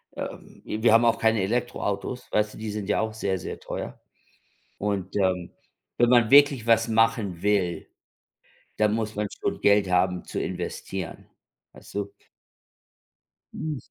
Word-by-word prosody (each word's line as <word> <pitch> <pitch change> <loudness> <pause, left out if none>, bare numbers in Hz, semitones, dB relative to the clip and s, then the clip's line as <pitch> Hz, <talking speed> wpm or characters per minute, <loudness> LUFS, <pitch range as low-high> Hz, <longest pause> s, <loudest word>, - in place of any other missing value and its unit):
ähm, - - -8
i 110 - -4
wir 120 - +6
haben 115 +1 +6
auch 115 - +3
keine 110 -2 +3
Elektroautos, 120 +2 -2
weißt 105 0 +1
du, - - -11
die 110 -1 -5
sind 105 -2 -4
ja 105 - +2
auch 110 0 -2
sehr, 100 -3 -1
sehr - - -6
teuer. - - -6 0.8
Und, 100 -2 -2
ähm, 95 -3 0 0.4
wenn 120 0 +3
man 120 -3 +5
wirklich 140 -4 +6
was 115 0 +4
machen 115 -5 +1
will, 100 -4 0 0.9
dann 105 -1 +3
muss 110 -1 -2
man 105 0 -1
schon - - -2
Geld 100 -1 +4
haben 90 0 +1
zu - - -4
investieren, 90 0 -5 0.4
weißt - - -15
du? 100 0 -3 1.4
Hm. 155 -2 -4
105 Hz, 150 wpm, -26 LUFS, 95-115 Hz, 1.4 s, wir